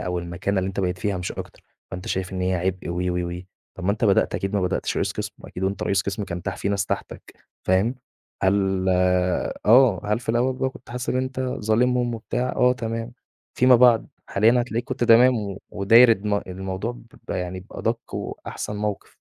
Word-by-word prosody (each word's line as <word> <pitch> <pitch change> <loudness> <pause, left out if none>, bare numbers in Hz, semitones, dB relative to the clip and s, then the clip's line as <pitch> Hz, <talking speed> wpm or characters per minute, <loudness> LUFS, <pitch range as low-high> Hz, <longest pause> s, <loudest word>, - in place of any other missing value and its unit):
أو 90 -1 -2
المكانة 85 +3 -2
اللي 95 +1 0
أنت 95 +1 -3
بقيت 90 -1 -1
فيها 100 +1 -1
مش 90 0 -4
أكتر، - - -9 0.3
فأنت 90 +1 -7
شايف 95 0 -2
إن 95 - -3
هي 95 0 +1
عِبء 90 +1 -2
و، 90 - -2 0.2
و، 85 -1 -2
و، - - -9 0.4
طَب 90 - -6
وأنت 100 +3 +1
بدأت 100 -3 +3
أكيد 95 +1 -2
ما 100 - +2
بدأتش 90 -1 -1
رئيس - - 0
قسم، - - -5
وأكيد 90 - -9
وأنت 100 +1 -2
رئيس 95 -2 +1
قسم 100 +2 -3
كان 85 -1 -5
تح 95 - -2
كان - - -10
في 100 - -1
ناس 100 -2 0
تحتك - - -5 0.3
فاهم؟ 95 +7 +2 0.5
هل 95 -1 +2 0.8
آه، 115 -2 +6
هل 105 +2 +1
في 120 - -14
الأول 130 +3 +1
كنت 130 - -15
حاسس 125 0 -5
إن - - +1
أنت 130 0 -2
كنت 130 -1 -2
ظالمهم 120 +2 +2
وبتاع؟ 120 +2 -2
آه 125 0 +4
تمام، 115 -1 -4 0.4
فيما 125 0 +6
بعد، 120 -2 +5 0.2
حاليًا 115 +5 +3
هتلاقيك 120 0 -2
كنت - - -2
تمام 120 +2 +6
و 100 -3 -5
وداير 115 +4 +6
الم 105 0 -1
الموضوع 95 +4 -4
ب 120 -1 -14
يعني 90 0 -3
بأدَق 115 +4 -4
وأحسن 105 - -5
موقِف. 105 -1 -3
105 Hz, 200 wpm, -23 LUFS, 95-120 Hz, 0.8 s, آه